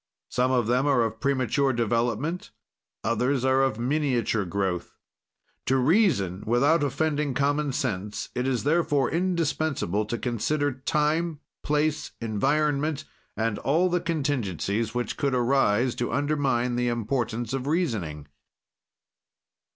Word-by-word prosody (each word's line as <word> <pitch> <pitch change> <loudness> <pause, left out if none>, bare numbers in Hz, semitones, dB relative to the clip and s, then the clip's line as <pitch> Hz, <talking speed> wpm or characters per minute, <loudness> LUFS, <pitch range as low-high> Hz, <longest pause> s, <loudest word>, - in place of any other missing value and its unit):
"Some 125 +1 +1
of 125 -3 +2
them 125 +5 +2
are 135 -5 +3
of 110 0 -3
premature 135 +1 +1
development; 120 - -1 0.5
others 125 +3 +1
are 130 0 +3
of 135 -5 +1
miniature 125 -5 0
growth. 95 -1 -2 0.7
"To 135 - +3
reason 130 - +2
without 140 +8 +3
offending 145 0 0
common 145 +1 +1
sense, 105 -4 -3
it 125 +1 -1
is, 125 -3 0
therefore, 145 -3 +2
indispensable 160 - 0
to 120 +3 -3
consider 145 +5 0
time, 150 +4 0 0.2
place, 150 +1 0
environment, 145 +6 0 0.3
and 110 -2 -1
all 170 +6 +2
the 175 0 0
contingencies 115 - -1
which 120 0 -2
could 140 -2 0
arise 125 -2 +2
to 120 - -2
undermine 135 -5 0
the 125 0 +1
importance 120 0 -2
of 135 0 -3
reasoning." 110 - -1
130 Hz, 120 wpm, -26 LUFS, 115-150 Hz, 0.7 s, are